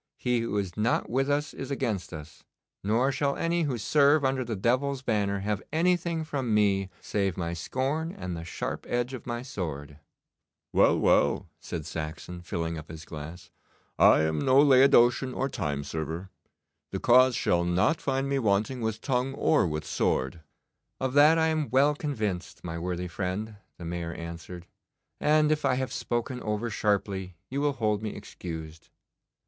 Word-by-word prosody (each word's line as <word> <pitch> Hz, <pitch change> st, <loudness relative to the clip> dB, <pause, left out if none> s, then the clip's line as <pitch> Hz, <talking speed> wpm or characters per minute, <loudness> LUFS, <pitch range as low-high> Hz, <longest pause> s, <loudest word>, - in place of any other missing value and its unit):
He 125 Hz, -1 st, +1 dB
who 115 Hz, -2 st, -2 dB
is 95 Hz, -3 st, -2 dB
not 110 Hz, +2 st, 0 dB
with 135 Hz, +3 st, +1 dB
us 145 Hz, +1 st, 0 dB
is 135 Hz, -, -6 dB
against 105 Hz, -10 st, -2 dB
us, 75 Hz, -1 st, -10 dB, 0.4 s
nor 115 Hz, +7 st, +2 dB
shall 140 Hz, 0 st, 0 dB
any 170 Hz, +1 st, 0 dB
who 130 Hz, -4 st, -1 dB
serve 145 Hz, +5 st, +4 dB
under 130 Hz, 0 st, +1 dB
the 115 Hz, -2 st, -3 dB
devil's 130 Hz, +6 st, 0 dB
banner 100 Hz, -4 st, 0 dB
have 105 Hz, 0 st, -1 dB
anything 170 Hz, 0 st, +1 dB
from 135 Hz, -7 st, -1 dB
me 100 Hz, -2 st, +2 dB
save 100 Hz, -4 st, -1 dB
my 85 Hz, -2 st, -2 dB
scorn 135 Hz, -, -2 dB
and 90 Hz, -, -5 dB
the 80 Hz, -, -6 dB
sharp 85 Hz, -, -5 dB
edge 120 Hz, +2 st, -1 dB
of 130 Hz, -, -8 dB
my 120 Hz, 0 st, -3 dB
sword.' 75 Hz, -, -6 dB, 0.7 s
'Well, -, -, +5 dB
well,' -, -, +3 dB
said 80 Hz, -3 st, -6 dB
Saxon, 80 Hz, +2 st, -6 dB
filling 85 Hz, -3 st, -3 dB
up 75 Hz, -, -12 dB
his 80 Hz, 0 st, -9 dB
glass, 80 Hz, +3 st, -9 dB, 0.5 s
'I -, -, +7 dB
am 80 Hz, -1 st, 0 dB
no 130 Hz, -, +4 dB
Laodicean 130 Hz, -2 st, +5 dB
or 135 Hz, -, 0 dB
time 70 Hz, -, -3 dB
server. 80 Hz, +5 st, -5 dB, 0.6 s
The -, -, -4 dB
cause 125 Hz, +1 st, +5 dB
shall 85 Hz, 0 st, +2 dB
not 90 Hz, -, +2 dB
find 135 Hz, +1 st, 0 dB
me 140 Hz, 0 st, 0 dB
wanting 110 Hz, +3 st, +1 dB
with 110 Hz, 0 st, -2 dB
tongue 130 Hz, 0 st, -1 dB
or 150 Hz, -, +3 dB
with 75 Hz, -1 st, -3 dB
sword.' 65 Hz, +5 st, -1 dB, 0.6 s
'Of 130 Hz, -1 st, -1 dB
that 150 Hz, +3 st, +6 dB
I 160 Hz, 0 st, +3 dB
am 155 Hz, -2 st, -1 dB
well 140 Hz, +3 st, +4 dB
convinced, 110 Hz, -, -3 dB
my 85 Hz, -1 st, -4 dB
worthy 90 Hz, +1 st, -3 dB
friend,' 100 Hz, +4 st, -4 dB, 0.2 s
the 85 Hz, -, -8 dB
Mayor 85 Hz, -1 st, -4 dB
answered, 85 Hz, +1 st, -8 dB, 0.5 s
'and 155 Hz, 0 st, +3 dB
if 155 Hz, 0 st, 0 dB
I 135 Hz, -2 st, +3 dB
have 130 Hz, 0 st, -2 dB
spoken 120 Hz, +1 st, -2 dB
over 105 Hz, +2 st, -2 dB
sharply 100 Hz, -3 st, -1 dB, 0.2 s
you 140 Hz, +1 st, -1 dB
will 145 Hz, -1 st, +2 dB
hold 105 Hz, -4 st, 0 dB
me 110 Hz, -1 st, -4 dB
excused. 80 Hz, -2 st, -8 dB
110 Hz, 170 wpm, -28 LUFS, 85-135 Hz, 0.7 s, I